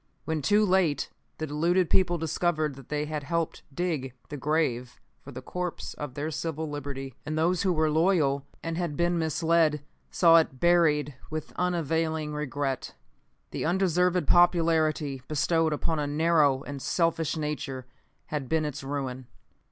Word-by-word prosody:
When 160 -1 -1
too 210 +8 +3
late 180 -7 +1 0.3
the 155 - -3
deluded 170 +4 +1
people 175 -1 +2
discovered 155 -1 0
that 135 -2 -14
they 150 0 -1
had 150 0 -3
helped 165 +3 -2
dig 150 -5 -2 0.2
the 150 - -5
grave 140 -4 -1 0.2
for 140 - -11
the 130 0 -8
corpse 180 +3 -4
of 145 -4 -7
their 150 +2 -3
civil 160 +1 -3
liberty, 140 -2 -5
and 155 +2 -3
those 170 +2 +2
who 190 - +2
were 155 -2 +2
loyal 150 -5 +2 0.2
and 165 +1 -3
had 170 -5 -2
been 175 0 +1
misled 160 -1 +2 0.3
saw 165 -2 +6
it 145 -5 +1
buried 155 -4 +3 0.2
with 155 0 -5
unavailing 160 -3 -1
regret. 145 -2 -3 0.6
The - - -3
undeserved 180 -1 +2
popularity 160 -5 +3
bestowed 160 +2 +1
upon 155 +1 -1
a 145 - -1
narrow 150 -3 +3
and 140 -1 -7
selfish 165 -1 0
nature 145 -4 -4 0.5
had 145 -4 -3
been 160 -1 +1
its 145 -1 -5
ruin. 135 -2 -4
155 Hz, 150 wpm, -27 LUFS, 145-170 Hz, 0.6 s, saw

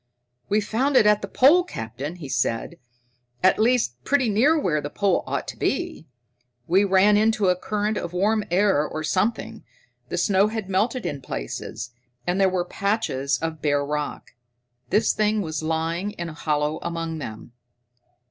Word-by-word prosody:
"We 210 +1 +2
found 255 +7 +1
it 215 - +6
at 210 0 +4
the 200 - -4
pole, 295 - +5
Captain," 140 - -6
he 165 -5 -8
said. 130 +5 -2 0.6
"At 185 - +4
least, 220 - +1
pretty 275 -4 +2
near 255 +10 +4
where 150 - 0
the 145 - -5
pole 200 +5 +1
ought - - -3
to - - -8
be. 345 - -2 0.6
We 185 +7 +3
ran 200 +1 +4
into 215 -2 +2
a 180 - +3
current 210 +3 -2
of 170 - -5
warm 210 +4 +1
air 185 -4 +3
or 155 +1 -5
something. 195 +8 -1 0.5
The - - -3
snow 200 0 +3
had 220 -2 -4
melted 230 +6 0
in 140 -2 -3
places, 120 - -6 0.3
and 180 +2 0
there 190 - +5
were 180 -1 -1
patches 190 -10 -1
of 160 -2 -3
bare 145 -1 +1
rock. 150 0 -4 0.6
This 215 - +3
thing 215 -1 +1
was 155 -2 -4
lying 165 +5 -2
in 170 -4 -5
a - - -8
hollow 150 0 -1
among 165 -1 -4
them." 110 -4 -8
185 Hz, 165 wpm, -24 LUFS, 155-215 Hz, 0.6 s, it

